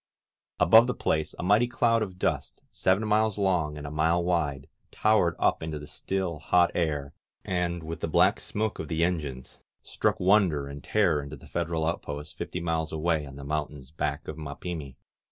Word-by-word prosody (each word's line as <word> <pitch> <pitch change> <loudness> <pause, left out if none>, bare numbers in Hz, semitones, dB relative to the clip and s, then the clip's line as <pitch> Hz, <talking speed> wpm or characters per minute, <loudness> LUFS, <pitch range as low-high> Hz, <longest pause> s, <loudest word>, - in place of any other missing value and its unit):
Above 110 +8 +7
the 125 - -1
place 80 -1 -1
a - - -5
mighty 105 +6 +4
cloud 115 -1 +2
of 95 -4 -4
dust, - - -2
seven 95 +4 +1
miles 110 -1 +2
long 90 -7 +1
and 75 - -7
a 70 - -5
mile 80 +3 +2
wide, 75 -6 -1 0.2
towered 105 -6 +2
up - - +2
into 80 -1 -4
the 75 - -8
still, 95 -1 -3
hot 85 +3 +3
air, 75 -5 -1 0.3
and, 85 -2 -1
with 80 0 -5
the - - -2
black - - +4
smoke 110 0 -3
of 80 - -4
the 80 +2 0
en 90 0 +2
gines, 65 -4 -8 0.2
struck - - -1
wonder 90 -7 +3
and 70 0 -8
terror 85 -9 +2
into 70 +1 -8
the 65 - -15
Federal 80 -1 -2
out 85 +2 -1
posts 75 +1 -6
fifty 90 - -5
miles 80 -2 -1
away 80 -1 0
on 70 - -10
the 70 - -9
mountains 75 -2 -4
back 75 -1 -3
of 75 0 -6
Ma 70 -2 -6
pimi. 80 -7 -6
80 Hz, 195 wpm, -27 LUFS, 75-90 Hz, 0.3 s, Above